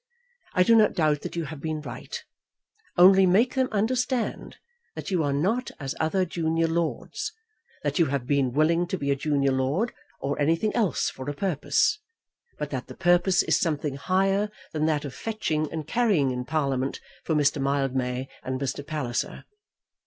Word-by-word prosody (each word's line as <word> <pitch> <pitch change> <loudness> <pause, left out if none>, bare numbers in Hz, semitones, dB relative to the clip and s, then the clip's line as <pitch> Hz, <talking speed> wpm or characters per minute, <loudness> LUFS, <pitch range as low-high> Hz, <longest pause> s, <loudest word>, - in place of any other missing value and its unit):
I 180 - +6
do 230 - +4
not 215 -2 +5
doubt 155 -3 +2
that - - -6
you 170 - -1
have 150 -1 -7
been 155 -1 -2
right, 150 - -7 0.7
only 190 +1 +7
make 215 +8 +4
them 260 -1 +1
understand 245 +3 -1 0.4
that - - -6
you 180 -3 +2
are 145 - 0
not 195 - 0
as 135 -2 -3
other 185 +4 +1
junior 165 -1 0
lords; 170 - -2 0.5
that - - -1
you 165 - +4
have 135 -2 -2
been 135 -1 +1
willing 165 +5 +2
to 190 - -2
be 140 -3 -1
a - - +3
junior 140 -1 +1
lord, 135 - 0 0.3
or 140 +2 -2
anything 165 +8 +1
else 210 - +1
for 130 +2 -6
a 145 - -4
purpose; 190 - +1 0.6
but - - -4
that - - -4
the - - -11
purpose 175 +1 +3
is - - +2
something 150 -4 -1
higher 195 +5 +1 0.2
than 155 0 +1
that 150 -2 0
of 135 - -6
fetching 155 -9 -2
and 160 -2 -4
carrying 195 - +2
in 125 0 -3
Parliament 135 -3 -1 0.2
for 160 - 0
Mr. 145 -1 +2
Mildmay 135 -2 0
and 130 0 -3
Mr. 140 +1 -3
Palliser." 140 -5 -3
155 Hz, 175 wpm, -26 LUFS, 140-190 Hz, 0.7 s, only